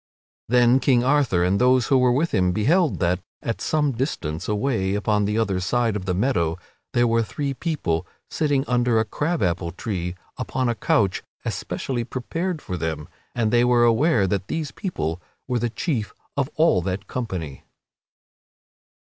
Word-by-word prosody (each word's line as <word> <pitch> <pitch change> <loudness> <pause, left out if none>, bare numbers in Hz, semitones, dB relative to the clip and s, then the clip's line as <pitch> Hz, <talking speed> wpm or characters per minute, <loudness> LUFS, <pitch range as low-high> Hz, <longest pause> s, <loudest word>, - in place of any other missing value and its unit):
Then 125 +1 +5
King 125 -2 +3
Arthur 130 -10 +2
and 95 +4 +2
those 125 0 +4
who 135 - +5
were 125 -1 +4
with 150 +7 +1
him 90 -1 +2
beheld 155 - +2
that, 90 +1 +2 0.2
at 115 - -3
some 150 -2 +1
distance 100 - -3
away 105 -2 0
upon 105 0 +1
the 105 +2 0
other 100 -5 +1
side 115 +3 0
of 100 -3 -4
the 90 -2 0
meadow, 90 -7 +1 0.4
there 120 -1 +3
were 115 0 +2
three 135 +7 -3
people 125 - -2 0.2
sitting 145 -3 0
under 120 -2 +2
a 110 - +1
crab 150 +8 -1
apple 85 -1 0
tree 90 -2 -4 0.2
upon 130 -1 -1
a - - +2
couch 100 -4 +1 0.2
especially 125 -3 -3
prepared 155 +8 -3
for 90 - -4
them, 80 -2 -3 0.3
and 110 -3 +1
they 120 0 +4
were 120 -1 +4
aware 120 - +4
that 95 +1 -1
these 160 -3 -3
people 90 - -3 0.3
were 125 -2 0
the 120 +1 0
chief 120 -3 -2 0.2
of 140 -1 0
all 160 - +4
that 95 +3 -3
company. 90 - -5
115 Hz, 165 wpm, -23 LUFS, 95-135 Hz, 0.4 s, Then